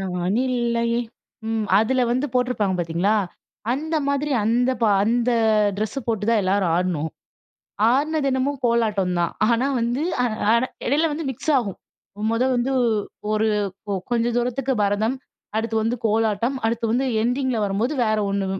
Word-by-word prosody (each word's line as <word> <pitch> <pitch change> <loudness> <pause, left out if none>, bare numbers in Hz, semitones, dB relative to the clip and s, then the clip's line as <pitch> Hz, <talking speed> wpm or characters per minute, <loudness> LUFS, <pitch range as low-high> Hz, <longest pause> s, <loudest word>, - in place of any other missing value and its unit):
நான் 180 +1 -1
இல்லையே. 235 -1 0 0.5
ம். 225 -1 -1
அதில 255 +4 +2
வந்து 255 +4 +1
போட்டிருப்பாங்க, 250 -6 +1
பார்த்தீங்களா! 175 +5 +1 0.6
அந்த 315 +5 -2
மாதிரி 280 +1 0
அந்த 240 +4 +2
ப - - +5 0.2
அந்த 240 +2 +1 0.5
ட்ரெஸ்ஸு 215 +6 -2
போட்டு 220 -3 -1
தான் 225 -2 +3
எல்லாரும் 190 -2 +1
ஆடுனோம். 170 -3 -1 0.8
ஆடுனதென்னமோ 280 -1 +1
கோலாட்டம் 215 -6 +1
தான். 170 - 0 0.2
ஆனா 240 +2 +2
வந்து 240 +4 -1 0.2
அ - - +2 0.3
ஆனா 235 +2 +3 0.2
இடையில 305 +5 +2
வந்து 315 +2 -4
மிக்ஸ் 265 +5 -3
ஆகும். 205 -7 -4 0.5
1 230 +2 +1
வந்து, 245 +2 0 0.6
ஒரு 215 +1 +2 0.4
கொ 205 - -3 0.2
கொஞ்ச 235 -1 +1
தூரத்துக்கு 250 +2 0
பரதம், 210 +5 +1 0.4
அடுத்து 225 0 -1
வந்து 230 +3 0
கோலாட்டம், 225 +3 +1
அடுத்து 230 0 -1
வந்து 250 +4 +1 0.2
என்டிங்கில 250 0 0
வரும்போது 205 +7 -1
வேற 215 -1 +1
1 200 -1 -1
230 Hz, 140 wpm, -22 LUFS, 210-255 Hz, 0.8 s, ப